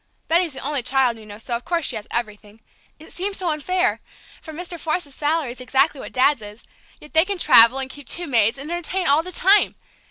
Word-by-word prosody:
Betty's 335 -1 +1
the - - -6
only 290 -2 -1
child, 250 -1 +1
you 215 - -14
know, 205 0 -10
so, 235 +2 -4
of 235 - -6
course, 335 -3 -2
she 250 - 0
has 210 -1 -7
everything. 215 -2 -5 0.4
It 315 - -12
seems 390 +2 -3
so 355 -3 -1
unfair, 365 +5 -1 0.4
for 320 - -10
Mr. 345 +2 -7
Forsythe's 310 -3 -3
salary 300 -3 -1
is 255 - -11
exactly 270 +3 +1
what - - -8
Dad's 260 0 +2
is; 210 +2 -12 0.4
yet 300 - -14
they 320 0 +6
can 395 +1 -3
travel, 235 -6 +7
and 265 -1 -2
keep 285 +1 -12
two 350 - -2
maids, 230 -5 +2
and 285 +4 -7
entertain 350 +2 -1
all 285 +3 +4
the 365 +2 -7
time! 390 +3 +3
290 Hz, 225 wpm, -21 LUFS, 245-345 Hz, 0.4 s, travel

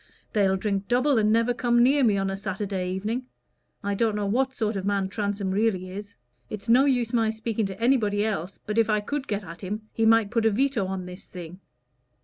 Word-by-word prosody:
They'll 195 -2 +3
drink 200 0 -2
double, 255 +1 +3
and 210 0 +3
never 230 +2 +3
come 240 0 +3
near 275 +2 +4
me 210 -4 +3
on 195 0 0
a - - -2
Saturday 195 -1 -3
evening. 220 +7 -3 0.6
I 200 0 -1
don't 215 +1 +1
know 210 -1 -1
what 260 +6 0
sort 220 -2 -1
of 195 - -3
man 200 -1 0
Transome 200 -1 -2
really 190 -3 0
is. 205 +2 -8 0.3
It's 210 +1 -7
no 250 +4 +5
use 245 -4 +1
my 225 -2 +2
speaking 220 -1 -2
to 195 +1 -8
anybody 220 -4 +2
else, 195 -3 -3
but 210 +2 0
if 225 - +3
I 210 -1 +3
could 275 +6 -4
get 205 -1 -2
at 170 -1 -10
him, 210 +3 -4
he 225 -1 +2
might 225 -2 +4
put 230 -2 +2
a - - +5
veto 230 -2 +1
on 190 -1 -4
this 180 +1 -10
thing. 180 0 -9
210 Hz, 220 wpm, -26 LUFS, 195-230 Hz, 0.6 s, no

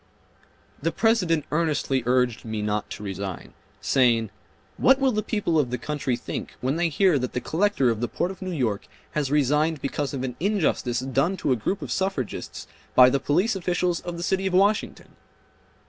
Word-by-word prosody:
The 165 +3 0
President 180 -10 +2
earnestly 150 -4 +1
urged 125 -2 +2
me 110 -2 -4
not 105 0 -2
to - - -7
resign, 95 -2 -6 0.3
saying, 115 -5 +2 0.5
"What 265 +1 +5
will 270 -1 +3
the 215 -2 0
people 195 -8 0
of 135 -5 +1
the 125 - -2
country 135 0 -2
think - - -6
when 130 +3 -1
they 170 0 +1
hear 175 -2 +3
that 125 -1 -3
the 125 - -1
Collector 160 -4 +1
of 110 -1 -3
the 120 - 0
Port 180 - -2
of 195 - -12
New 185 - -4
York 120 - -1 0.2
has 150 -3 -1
resigned 150 +2 +2
because 140 +1 -2
of 130 - -3
an 125 -2 -4
injustice 165 - 0
done 135 +8 0
to 140 - -1
a - - +4
group 120 - -2
of - - -6
suffragists 190 - -3 0.3
by 125 0 +8
the 140 - +1
police 180 - +1
officials 180 -1 0
of 175 -1 -6
the 170 - -4
city 190 +1 0
of 185 - -1
Washington?" 200 +3 +1
150 Hz, 190 wpm, -25 LUFS, 125-180 Hz, 0.5 s, by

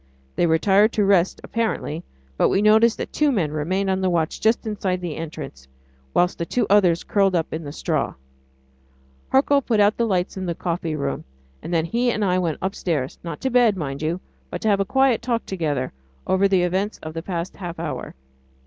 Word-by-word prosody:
They 175 - +2
retired 195 +6 +4
to 210 - +2
rest 195 -2 +3
apparently, 220 -8 -2 0.3
but - - +3
we 195 - +2
noticed 220 +2 +5
that - - -5
two 300 -1 +3
men 175 - 0
remained 180 +6 -1
on 190 0 0
the 190 - +2
watch 165 -2 -1
just 220 +2 +2
inside 195 -4 -1
the 175 -4 -4
entrance, 150 - -7 0.4
whilst 180 - +1
the 170 - -1
two 240 +4 +1
others 180 -5 +4
curled 195 -2 +2
up 165 -2 -1
in 160 +1 -4
the 145 - -6
straw. 155 -1 -2 1.1
Hercule 280 +1 +4
put 230 -4 0
out 205 +1 +4
the 235 - +1
lights 185 -2 -1
in 190 -1 -3
the 170 - -2
coffee 170 -2 -2
room, 140 -2 -3 0.4
and - - -7
then 165 -2 +1
he 240 +7 +1
and 215 -3 0
I 185 -1 +2
went 165 -4 -1
upstairs 165 -8 -2
not 165 -3 -6
to 265 - -1
bed, 235 -5 +4
mind 140 -4 -4
you 165 +3 -1 0.3
but - - -5
to 220 - +1
have 200 -1 +3
a 195 - +1
quiet 265 +1 +3
talk 235 -1 -1
together 150 -8 -2 0.3
over 190 +1 +3
the 190 -2 +3
events 190 +4 -1
of 155 - -6
the 165 - -4
past 175 0 -4
half 175 -3 -6
hour. - - -5
185 Hz, 205 wpm, -23 LUFS, 165-210 Hz, 1.1 s, noticed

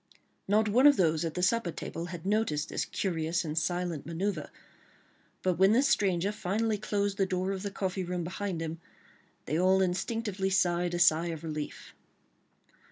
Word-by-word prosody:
Not 215 +2 +3
one 250 +7 +5
of 285 - +6
those 160 -3 +2
at 165 -2 -3
the 180 - -1
supper 215 0 +2
table 165 +1 -6
had 175 -1 -8
noticed 195 -7 0
this - - -2
curious 170 -1 -1
and 155 -1 -4
silent 175 -1 -2
manœuvre, 170 -1 -2 0.9
but 185 -2 0
when 195 +2 +6
the 255 +4 +4
stranger 195 -6 +2
finally 210 +2 -1
closed 205 -1 -1
the 195 - +3
door 185 +1 -1
of 195 -1 -3
the 200 - -3
coffee 190 -1 -3
room 180 0 -3
behind 180 -1 -3
him, 165 +1 -5 0.6
they 155 +4 -1
all 190 +1 +4
instinctively 195 +1 -1
sighed 175 -2 +1
a - - 0
sigh 170 -1 +4
of 165 -1 -5
relief. 155 -2 -6
180 Hz, 170 wpm, -30 LUFS, 170-200 Hz, 0.9 s, of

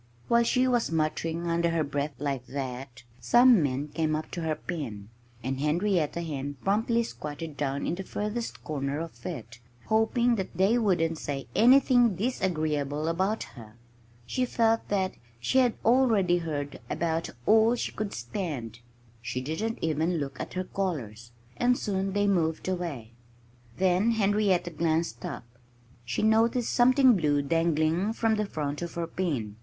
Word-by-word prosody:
While 235 0 +4
she 255 +2 +2
was 240 -7 +1
muttering 165 +1 -1
under 170 0 +1
her 165 -1 +1
breath 145 0 -3
like 135 -2 -3
that 130 -2 -6 0.2
some 240 -4 +6
men 140 +1 -1
came 155 0 0
up 155 - -5
to 175 - -4
her 160 -1 -1
pen. 115 - -6 0.3
And 130 +2 -2
Henrietta 170 +2 0
Hen 145 -3 -4
promptly 225 +4 +2
squatted 150 -6 -7
down 140 -1 -2
in - - -1
the 190 +2 -4
furthest 210 +4 -4
corner 140 -1 -2
of 155 -8 -8
it, 115 0 -7 0.3
hoping 235 +2 +2 0.2
they 195 +7 +3
wouldn't 165 -7 +1
say 135 -3 -4
anything 245 -2 +5
disagreeable 155 - -1
about 190 +6 0
her. 110 -2 -13 0.5
She 255 - -1
felt 230 -2 +1
that 190 -2 0 0.3
she 190 - +2
had 245 -3 +3
already 220 -8 +4
heard 145 -4 -4
about 165 0 -1 0.2
all 225 +2 +5
she - - -3
could 215 -1 -4
stand. 120 - -5 0.4
She 125 - -3
didn't 160 - -3
even 160 +2 +1
look 140 -3 -4
at - - -6
her 185 - -1
callers. 120 - -4 0.3
And 245 0 +3
soon 195 -1 -2
they 205 0 +2
moved 170 -5 +1
away. 165 -12 -3 0.7
Then 190 +5 +3
Henrietta 200 -4 +2
glanced 160 -5 -1
up. - - -6 0.6
She 120 - -2
noticed 225 +2 +3
something 255 0 +5
blue 145 -5 +1
dangling 165 +5 +1
from 225 -1 +1
the 210 -1 0
front 150 -4 -3
of 170 -1 -5
her 170 -1 -1
pen. 140 - -3
170 Hz, 150 wpm, -28 LUFS, 145-215 Hz, 0.7 s, some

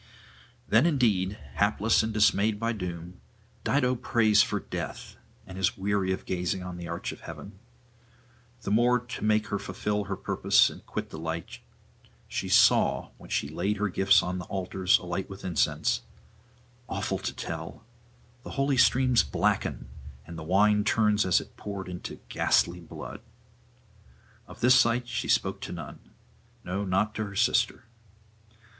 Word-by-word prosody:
Then 115 +9 +4
indeed, 105 - +2 0.2
hapless 105 +2 +2
and 110 0 -2
dismayed 105 0 +2
by 115 +1 0
doom, 90 -3 -7 0.4
Dido 130 -2 +2
prays 115 -3 +3
for - - 0
death, - - -6 0.3
and 95 0 -9
is 95 - +1
weary 100 -1 0
of 95 - -3
gazing 90 0 -2
on 90 -1 -7
the 85 -1 -7
arch 85 +1 -4
of - - -10
heaven. 100 -1 -10 1.0
The - - -3
more 120 +3 +4
to 120 -3 -7
make 110 0 +2
her 100 -1 -1
fulfil 105 +1 -2
her 100 +1 -3
purpose 95 - +3
and - - -12
quit - - -5
the 80 - -7
light, 80 0 -5 0.7
she - - -4
saw, - - +4
when - - -13
she - - 0
laid 90 +8 -2
her 105 0 0
gifts 100 +2 +4
on 90 +1 -3
the 90 - -6
altars 95 0 +1
alight 90 +1 -4
with 95 0 -9
incense, 80 -9 +1 0.9
awful - - -2
to - - -3
tell, 115 - -7 0.6
the - - -10
holy 135 -1 +1
streams 125 -1 +4
blacken, 70 -5 -1 0.4
and 85 - -9
the 80 - -7
wine 105 +5 +3
turn 110 0 +3
as 105 -4 +3
it - - -12
poured 100 -2 -6
into 90 -1 -7
ghastly 85 +1 +2
blood. 85 +5 -9 1.3
Of - - -13
this 125 +2 +6
sight 120 -1 +3
she 120 -1 -3
spoke - - +1
to - - -6
none - - -8 0.6
no, 95 +3 -3
not 100 +3 +1
to 110 - -3
her 100 -1 -9
sister. 120 +2 +1
100 Hz, 155 wpm, -28 LUFS, 90-110 Hz, 1.3 s, this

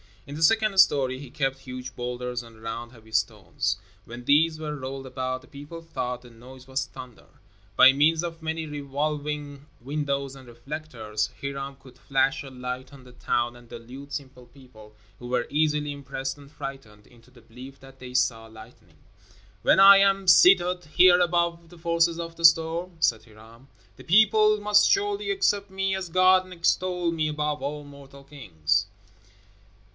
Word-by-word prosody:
In 140 - -9
the 155 - -7
second 215 +2 +3
story 130 -7 +4
he 140 -2 -10
kept 135 -1 -2
huge 125 -1 -8
boulders 125 0 -4
and 115 -2 -16
round 115 +1 -6
heavy 110 -3 -18
stones. 105 -6 -1 0.3
When 120 +1 -10
these 155 +3 +3
were 150 -1 -4
rolled 135 -1 -7
about 130 0 -4
the 130 - -19
people 145 +4 -10
thought 125 -6 -5
the 120 - -14
noise 125 +3 -14
was 130 0 -2
thunder. 130 -3 -12 0.5
By 130 - +8
means 155 +4 +2
of 165 -1 -6
many 160 0 -3
revolving 145 0 -4
windows 140 0 -3
and 130 -2 -14
reflectors, 120 -4 -5
Hiram 140 0 -5
could 130 -1 -18
flash 135 0 0
a 135 - -9
light 125 +1 -7
on 135 -2 -14
the 125 - -15
town 120 0 -2
and 120 -1 -17
delude 125 +4 -11
simple 135 -3 -7
people, 120 -5 -17 0.2
who 120 - -9
were 125 0 0
easily 150 -1 0
impressed 135 -1 -5
and 140 -1 -15
frightened, 135 -8 -9
into 120 0 -21
the 125 -1 -19
belief 125 +4 -13
that 135 0 -16
they 125 -1 -10
saw 115 -3 0
lightning. 110 0 -16 0.6
"When - - +4
I 195 0 +10
am 195 -1 +2
seated 180 +1 +5
here 175 +3 +5
above 170 -1 0
the 175 - -15
forces 170 0 +1
of 165 0 -6
the 165 - +1
storm," 165 +2 +3
said 115 -7 +1
Hiram, 115 +3 -17 0.3
"the - - -13
people 215 +2 +4
must 210 0 +4
surely 410 +1 0
accept 205 - 0
me 190 0 -1
as 190 -2 -5
God 185 +2 +4
and 185 - -11
extol 180 0 0
me 160 -2 -1
above 150 0 -2
all 145 +1 -4
mortal 140 -1 -14
kings." 95 - -1
140 Hz, 170 wpm, -25 LUFS, 125-165 Hz, 0.6 s, I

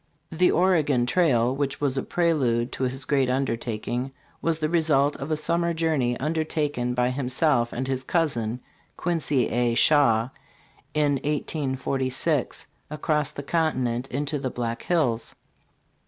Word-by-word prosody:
"The 175 +2 +3
Oregon 155 -9 +2
Trail," 125 -5 +2
which 140 0 -2
was 140 -2 0
a 135 - 0
prelude 130 -9 +1
to 130 - -2
his 130 +2 -3
great 135 -3 +1
undertaking, 125 0 -2 0.3
was 165 -1 +1
the 155 -1 -1
result 155 -4 +2
of 135 - -6
a 155 - +1
summer 170 +2 0
journey, 150 -7 0
undertaken 150 -4 -1
by 125 0 +1
himself 130 -1 +1
and 130 +2 -3
his 130 -1 -2
cousin, 125 -8 -1 0.4
Quincy 150 -7 0
A. 120 -1 +1
Shaw, 120 -4 +4 0.7
in 145 -2 +2
1846, 135 -3 -1 0.2
across 150 -1 0
the 145 - -8
continent 130 -6 0
into 145 +3 -2
the 135 -1 -2
Black 115 -1 -4
Hills. 125 -10 0
135 Hz, 135 wpm, -25 LUFS, 125-155 Hz, 0.7 s, Shaw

